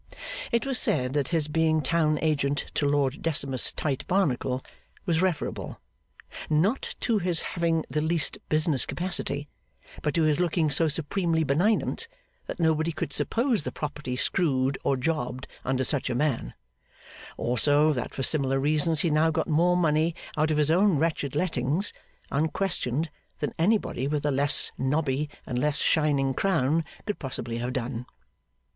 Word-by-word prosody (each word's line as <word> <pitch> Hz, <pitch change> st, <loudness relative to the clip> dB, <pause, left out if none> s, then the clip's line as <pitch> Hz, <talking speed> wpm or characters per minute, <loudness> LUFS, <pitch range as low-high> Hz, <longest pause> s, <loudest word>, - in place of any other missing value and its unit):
It 235 Hz, -, +1 dB
was 270 Hz, -2 st, +1 dB
said 125 Hz, 0 st, +2 dB
that 145 Hz, -2 st, 0 dB
his 165 Hz, -3 st, 0 dB
being 160 Hz, 0 st, +2 dB
town 155 Hz, +1 st, +2 dB
agent 145 Hz, -2 st, 0 dB
to 145 Hz, -, +1 dB
Lord 140 Hz, -1 st, +1 dB
Decimus 140 Hz, -6 st, +2 dB
Tite 140 Hz, -4 st, -2 dB
Barnacle 135 Hz, -8 st, 0 dB, 0.4 s
was 165 Hz, -3 st, +1 dB
referable, 185 Hz, -4 st, -2 dB, 0.7 s
not 180 Hz, -, +1 dB
to 225 Hz, -3 st, +1 dB
his 175 Hz, -2 st, +1 dB
having 165 Hz, -2 st, 0 dB
the 150 Hz, -, -1 dB
least 160 Hz, +1 st, +1 dB
business 155 Hz, -3 st, +2 dB
capacity, 150 Hz, -5 st, -1 dB, 0.5 s
but 150 Hz, -2 st, -1 dB
to 165 Hz, -, +3 dB
his 155 Hz, 0 st, +2 dB
looking 170 Hz, -3 st, +1 dB
so 160 Hz, +3 st, +3 dB
supremely 165 Hz, +2 st, 0 dB
benignant 190 Hz, -, +1 dB, 0.4 s
that -, -, -6 dB
nobody 160 Hz, 0 st, +2 dB
could 145 Hz, -2 st, -4 dB
suppose 235 Hz, -, +1 dB
the -, -, -4 dB
property 150 Hz, -4 st, -4 dB
screwed 135 Hz, -2 st, +1 dB
or 135 Hz, -, +1 dB
jobbed 125 Hz, -2 st, -2 dB, 0.2 s
under 130 Hz, 0 st, 0 dB
such 140 Hz, -1 st, 0 dB
a 125 Hz, -, -1 dB
man; 125 Hz, -, -1 dB, 0.8 s
also, 145 Hz, +5 st, +3 dB
that 125 Hz, -, -4 dB
for 135 Hz, -, -4 dB
similar 135 Hz, -1 st, +2 dB
reasons 155 Hz, +2 st, +2 dB
he 170 Hz, -, +1 dB
now 155 Hz, +2 st, +3 dB
got 160 Hz, -, -1 dB
more 175 Hz, +3 st, +3 dB
money 160 Hz, -1 st, +2 dB, 0.2 s
out 155 Hz, +1 st, +1 dB
of 155 Hz, -, +1 dB
his 150 Hz, 0 st, +3 dB
own 185 Hz, 0 st, +4 dB
wretched 145 Hz, -3 st, -1 dB
lettings, 160 Hz, +2 st, 0 dB, 0.4 s
unquestioned, 155 Hz, -2 st, -1 dB, 0.3 s
than 150 Hz, -, -3 dB
anybody 170 Hz, -, +1 dB
with 150 Hz, 0 st, -1 dB
a 145 Hz, -, +2 dB
less 140 Hz, +1 st, +3 dB
nobby 140 Hz, +1 st, 0 dB, 0.2 s
and 125 Hz, -, -2 dB
less 150 Hz, +2 st, 0 dB
shining 140 Hz, -4 st, +2 dB
crown 165 Hz, -2 st, +1 dB, 0.2 s
could 210 Hz, -1 st, -3 dB
possibly 120 Hz, -3 st, -4 dB
have 125 Hz, +1 st, -3 dB
done. 125 Hz, -1 st, -4 dB
150 Hz, 155 wpm, -27 LUFS, 135-165 Hz, 0.8 s, own